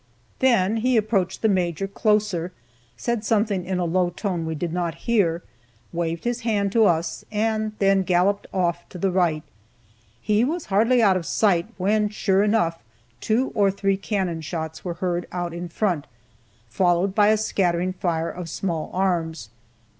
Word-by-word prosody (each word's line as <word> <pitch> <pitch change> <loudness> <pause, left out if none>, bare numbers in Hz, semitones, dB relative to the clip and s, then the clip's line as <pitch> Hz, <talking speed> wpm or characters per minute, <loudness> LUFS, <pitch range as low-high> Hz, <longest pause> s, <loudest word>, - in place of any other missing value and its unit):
Then 230 -5 +3
he 250 +2 +2
approached 210 -4 0
the - - +5
Major 185 -2 0
closer, 205 -4 0 0.5
said 235 - -2
something 210 -4 +1
in 185 0 -2
a 180 - 0
low 175 +1 +1
tone 175 -2 -3
we 160 - -2
did 165 +2 -3
not 175 -2 -2
hear, 180 -8 +2 0.5
waved 165 -1 -2
his 240 0 -1
hand 210 -4 0
to 225 +1 +4
us, 165 -2 0
and 215 0 0
then 195 -1 +3
galloped 185 +2 +1
off 175 -2 -1
to - - -9
the 190 +2 0
right. 170 -4 +1 0.8
He 210 - +2
was 315 +6 -2
hardly 230 +4 +4
out 195 -3 +5
of 170 - -5
sight, 180 -5 +2
when 210 +3 +1
sure 195 -2 +1
enough, 205 -6 +1 0.4
two 235 +5 0
or 200 -2 +3
three 195 0 0
cannon 190 -4 -2
shots 160 0 -5
were 175 -2 -4
heard 175 0 -2
out 175 -1 -3
in 175 +1 -6
front, 175 -5 -1 0.6
followed 175 - +1
by 205 0 +4
a 215 +1 +4
scattering 185 -4 0
fire 165 -3 -1
of 180 -2 -7
small 165 -2 -3
arms. 165 - -1
190 Hz, 165 wpm, -23 LUFS, 170-210 Hz, 0.8 s, the